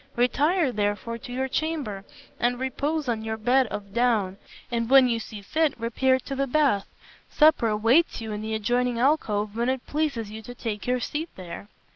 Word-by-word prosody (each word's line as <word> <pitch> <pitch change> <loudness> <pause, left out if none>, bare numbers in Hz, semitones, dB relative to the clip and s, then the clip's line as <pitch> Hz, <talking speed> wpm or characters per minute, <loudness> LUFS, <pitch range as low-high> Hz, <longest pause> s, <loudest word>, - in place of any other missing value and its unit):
Retire, 290 +6 +2
therefore, 210 +2 -2
to 245 - -9
your 260 +2 -1
chamber 270 -9 -2 0.4
and 245 +1 +1
repose 285 +3 -2
on 225 -2 -1
your 220 0 -3
bed 250 +4 +3
of 200 -1 -7
down, 220 -6 +1 0.3
and 230 -1 -1
when 265 -1 +7
you 230 -2 0
see 215 -2 -8
fit 310 +4 0
repair 260 +3 +2
to 275 - -5
the 275 +1 0
bath. 270 -8 +2 0.4
Supper 305 -6 +4
awaits 225 +11 +3
you 225 -1 -5
in 210 0 -4
the 220 0 -3
adjoining 245 +3 0
alcove 215 -6 +1
when 235 +2 0
it 260 -1 -2
pleases 275 -9 -2
you 220 +1 -7
to 245 +3 -10
take 220 -4 -5
your 250 0 +1
seat 310 +7 -3
there." 180 +1 -8
240 Hz, 185 wpm, -26 LUFS, 215-270 Hz, 0.4 s, when